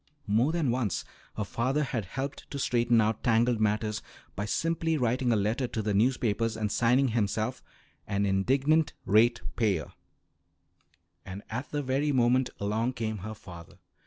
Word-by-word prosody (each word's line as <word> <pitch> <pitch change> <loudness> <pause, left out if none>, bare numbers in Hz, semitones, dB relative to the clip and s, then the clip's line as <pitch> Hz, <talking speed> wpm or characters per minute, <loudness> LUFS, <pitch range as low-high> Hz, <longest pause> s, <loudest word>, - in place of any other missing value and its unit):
More 115 +8 +2
than 160 -7 +1
once 120 -7 -1 0.3
her 105 - 0
father 130 +8 0
had 120 -6 -3
helped 135 +8 -5
to 140 - -5
straighten 120 -3 +2
out 110 0 0
tangled 115 0 +2
matters 105 0 0 0.3
by 105 - -2
simply 165 +6 0
writing 125 0 +1
a - - +4
letter 110 +5 0
to 110 - -3
the 105 0 0
newspapers, 115 0 +1
and 105 -2 -1
signing 125 +3 +3
himself 110 -4 -1 0.5
"An 100 -1 0
Indignant 135 +11 +2
Ratepayer." 110 -4 +2 1.3
And 95 +2 -8
at 120 +6 -4
the 145 -1 -2
very 135 +3 0
moment 125 0 +3
along 110 +5 0
came 110 -3 -3
her 110 +4 -6
father. 85 -4 -12
115 Hz, 150 wpm, -29 LUFS, 105-130 Hz, 1.3 s, a